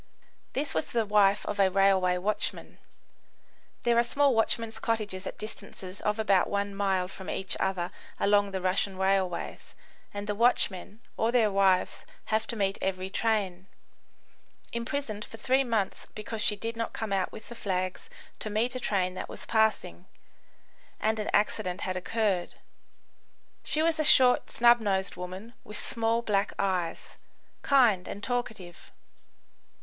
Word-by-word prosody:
This 285 +2 -1
was 160 - -1
the 230 -2 +1
wife 205 -1 +3
of 205 - -4
a 195 -1 +5
railway 190 -1 +3
watchman, 205 +4 -1 1.0
[There 235 0 +3
are - - +5
small 280 +3 +3
watchmen's 225 0 0
cottages 205 -4 -2
at - - -6
distances 195 -3 -7
of 210 +1 0
about 200 -4 +2
one 200 0 -1
mile 195 -2 0
from 190 0 -9
each 190 -1 -2
other 185 -2 -1 0.3
along 205 0 +3
the 190 -1 -4
Russian 185 +1 0
railways, 190 -2 -1 0.4
and 205 0 -5
the 210 - -1
watchmen 210 -2 +1 0.2
or 225 +1 +1
their 230 -4 +3
wives 195 -2 +2 0.3
have 220 +1 +1
to 235 - -3
meet 195 -2 0
every 190 0 -2
train.] 195 -5 -1 1.1
imprisoned 235 -3 -3
for 225 - -10
three 260 +4 +2
months 225 -6 -2
because 215 0 -5
she 210 - +3
did 225 +3 -4
not 230 0 -3
come 220 -3 -3
out 190 -1 0
with - - -11
the - - -7
flags 185 - -3 0.3
to 215 - -4
meet 225 +4 0
a 255 - -3
train 185 -6 0
that 185 - -6
was - - -8
passing, 215 -5 0 0.9
and 220 0 0
an 210 - -2
accident 185 -3 0
had 185 - -2
occurred. 195 -1 -1 1.1
She 310 - +1
was 325 -1 +1
a - - +3
short, 255 -4 +6
snub 240 0 +5
nosed 195 -3 0
woman, 185 +6 -8
with 210 - -8
small, 230 0 -1
black 200 -2 0
eyes; 185 -4 -2 0.4
kind 240 -10 +4
and 205 - -7
talkative. 220 -8 -4
205 Hz, 155 wpm, -28 LUFS, 190-230 Hz, 1.1 s, short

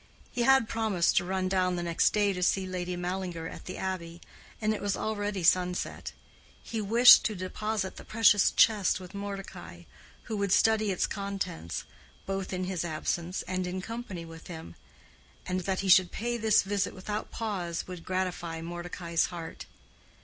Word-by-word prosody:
He 245 - -2
had 265 -1 +5
promised 220 -7 +1
to 175 - +4
run 185 0 -1
down 185 -1 +1
the 175 - -3
next 170 -1 +3
day 205 -1 +2
to 180 - -5
see 190 +1 +2
Lady 180 -1 -3
Mallinger 180 -2 -3
at - - -9
the 185 - -6
Abbey, 175 -3 -4 0.4
and 215 0 +1
it 215 - -5
was 200 -1 -1
already 205 -3 -2
sunset. 180 +1 +1 0.5
He 225 -1 -3
wished 230 +4 +8
to 215 - 0
deposit 195 +2 -3
the - - -9
precious 215 -3 +4
chest 210 -5 +3
with 185 +1 -11
Mordecai, 195 - -7 0.4
who 220 - -4
would 200 -2 -1
study 215 +1 +4
its 185 - +1
contents, 195 - -4 0.4
both 195 -1 -3
in 185 -1 -2
his 185 -2 -2
absence 170 +2 -2
and 185 0 -2
in 185 +1 -3
company 205 -4 -6
with 165 0 -11
him; 160 - -8 0.7
and 185 0 -1
that 190 +1 -1
he 195 - -3
should 185 -1 +6
pay 240 +2 -2
this 220 -2 +3
visit 200 0 -1
without 210 +3 -4
pause 185 -7 -3
would 180 -2 -8
gratify 180 -3 -2
Mordecai's 170 0 -2
heart. 170 -2 -7
185 Hz, 170 wpm, -29 LUFS, 175-205 Hz, 0.7 s, wished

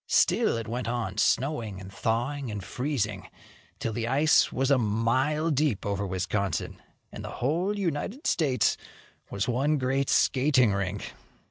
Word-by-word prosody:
Still - - +3
it 115 -1 -5
went 120 +2 -3
on, 115 -6 -2
snowing 115 -7 0
and 95 +1 -10
thawing 120 +6 -1
and 105 -2 -5
freezing 115 -6 -3 0.5
till 115 - -3
the 115 +1 -2
ice 145 +5 +4
was 135 +2 0
a 135 - +5
mile 130 +9 +1
deep 140 -7 0
over 100 0 -1
Wisconsin, 95 0 -2 0.3
and - - -8
the - - -6
whole 175 +11 0
United 195 - -3
States 140 -6 +2 0.5
was 100 +1 -2
one 135 +5 +1
great 135 +1 0
skating 130 -5 +3
rink. 100 0 -3
125 Hz, 145 wpm, -27 LUFS, 105-145 Hz, 0.5 s, a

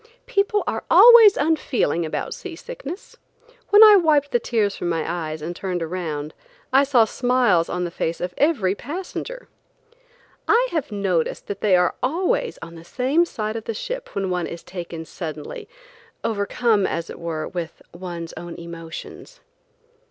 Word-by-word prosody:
People 415 -3 +1
are - - -3
always 465 -4 +9
unfeeling 255 - 0
about - - -4
sea 375 -4 -8
sickness. 485 -2 -9 0.5
When 415 +1 +8
I 425 -2 +9
wiped 300 -5 +2
the 240 - +2
tears 215 -4 0
from 175 - -3
my 165 -2 -1
eyes 160 -2 -4
and 175 +2 -5
turned 180 -2 -3
around, 160 -3 -4 0.4
I 270 +1 +6
saw 260 -5 +4
smiles 245 -8 +2
on 180 0 -2
the 175 - -3
face 165 0 -3
of 180 0 -4
every 270 - +2
passenger. 380 - -7 1.0
I - - +3
have 310 -8 -2
noticed 190 -5 -1
that 200 -1 -6
they 200 -3 +4
are 180 -1 +2
always 355 - 0
on 165 0 -9
the 165 -1 -11
same 265 - +1
side 215 -8 -4
of 225 - -5
the 225 - -4
ship - - -6
when 195 -2 -1
one 180 -1 -1
is 170 - -8
taken 170 -3 -7
suddenly, 155 -4 -7 0.5
overcome, 215 0 +1
as 165 0 -4
it - - -10
were, 165 -2 -4
with 175 -3 -6
one's 170 -2 -7
own 175 -1 -8
emotions. 170 - -9
200 Hz, 160 wpm, -22 LUFS, -, 1.0 s, always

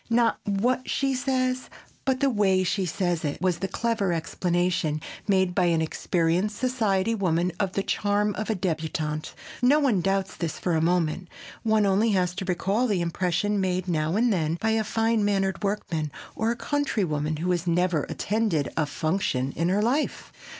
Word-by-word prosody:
"Not 230 0 +3
what 245 +6 0
she 275 -1 +1
says 255 -1 -1 0.4
but 265 0 +1
the 275 - +4
way 195 -4 +3
she 185 +1 0
says 175 -1 -1
it" 145 -2 -2
was 180 -2 0
the 195 - -1
clever 225 -4 0
explanation 170 -1 0 0.3
made 190 -3 +2
by 180 -1 +2
an 170 -2 +2
experienced 170 +5 0
society 225 -5 +1
woman 180 -4 +1
of 195 -2 0
the 195 - 0
charm 205 +1 +1
of 215 +3 -4
a 220 - +1
débutante. 160 -4 -2 0.3
If 270 +5 +5
one 225 -10 +3
doubts 195 +1 0
this 165 -3 -3
for 175 - -1
a 160 - +2
moment, 175 +1 +1 0.3
one 220 -1 +3
has 200 - +3
only 210 +3 +3
to 185 +1 0
recall 195 +7 +1
the 200 -6 +1
impression 180 +4 0
made 185 -1 -1
now 160 0 0
and 230 +1 +3
then 160 -3 0
by 220 - +1
a 220 0 +2
fine 225 0 +1
mannered 195 -3 0
workman 175 -7 -2 0.2
or 220 - 0
a 235 - 0
country 285 -4 -1
woman 150 -2 -1
who 175 +4 -1
has 175 0 -1
never 175 -3 +1
attended 210 -8 0
a 155 -2 +1
"function" 145 -4 -1
in 170 +2 0
her 200 +3 +2
life. 270 +7 -1
190 Hz, 180 wpm, -26 LUFS, 170-220 Hz, 0.4 s, If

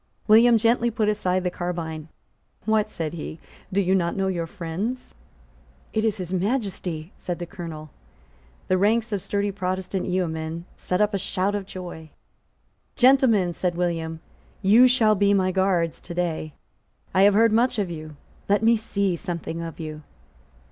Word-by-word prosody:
William 230 +2 +7
gently 230 +2 +2
put 220 -2 0
aside 185 -3 0
the 180 - -1
carbine. 165 -3 -4 0.6
"What," 220 -1 +2
said 160 -1 -4
he, 160 -1 -6 0.3
"do 195 - +1
you 190 -1 +2
not 170 -3 +1
know 195 - 0
your 170 -3 -2
friends?" 190 +10 -4 0.8
"It 220 - +1
is 220 -2 +1
His 185 -1 -5
Majesty;" 185 -5 -2
said 175 -1 -4
the 175 - -5
Colonel. 165 -5 -8 0.8
The 185 - +2
ranks 225 +3 +2
of 200 -2 -1
sturdy 200 +1 -1
Protestant 185 -1 -3
yeomen 165 -2 -2
set 180 +2 -1
up 210 0 +2
a 200 - 0
shout 190 +1 -1
of 200 -2 -3
joy. 175 -4 -8 0.9
"Gentlemen," 245 -9 +4
said 175 0 -1
William, 165 -2 -2 0.4
"you 225 +6 +7
shall 235 -4 +4
be 200 0 +3
my 185 -1 +2
guards 185 -3 +1
to 175 - -8
day. 165 -3 -2 0.6
I 190 - +4
have 200 0 +6
heard 225 +1 +5
much 235 +2 +2
of 195 -4 -1
you. 155 -2 -8 0.3
Let 205 +2 +3
me 230 +1 +5
see 200 -4 -1
something 170 -2 -5
of 165 -1 -7
you." 155 -1 -6
185 Hz, 160 wpm, -24 LUFS, 170-210 Hz, 0.9 s, William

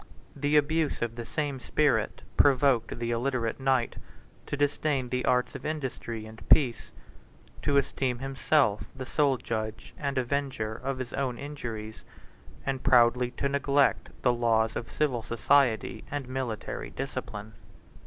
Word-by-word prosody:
The 145 +1 +2
abuse 155 -2 +1
of 115 -1 -2
the 120 -1 -7
same 145 -3 -2
spirit 145 +3 +1
provoked 135 -5 +4
the 120 0 -2
illiterate 120 -1 -1
knight 130 -3 +1 0.5
to 140 - -3
disdain 145 -2 0
the 125 0 -1
arts 125 0 +2
of 135 - -8
industry 130 -7 -4
and 110 0 -12
peace; 120 -7 +4 0.7
to 140 - +2
esteem 130 -2 0
himself 135 -3 +1
the 130 - -6
sole 140 -1 +2
judge 110 -2 -4
and 140 -2 -2
avenger 130 -4 -1
of 130 +3 -3
his 130 -2 -5
own 130 -3 -1
injuries; 115 -7 -6 0.6
and 135 -1 -1
proudly 120 0 +4
to 140 - +1
neglect 140 0 +2
the 125 - +4
laws 115 -1 +2
of 115 - -5
civil 135 -6 0
society 115 +1 +2
and 145 -3 -4
military 130 -4 -4
discipline. 105 +1 -6
130 Hz, 140 wpm, -28 LUFS, 115-140 Hz, 0.7 s, provoked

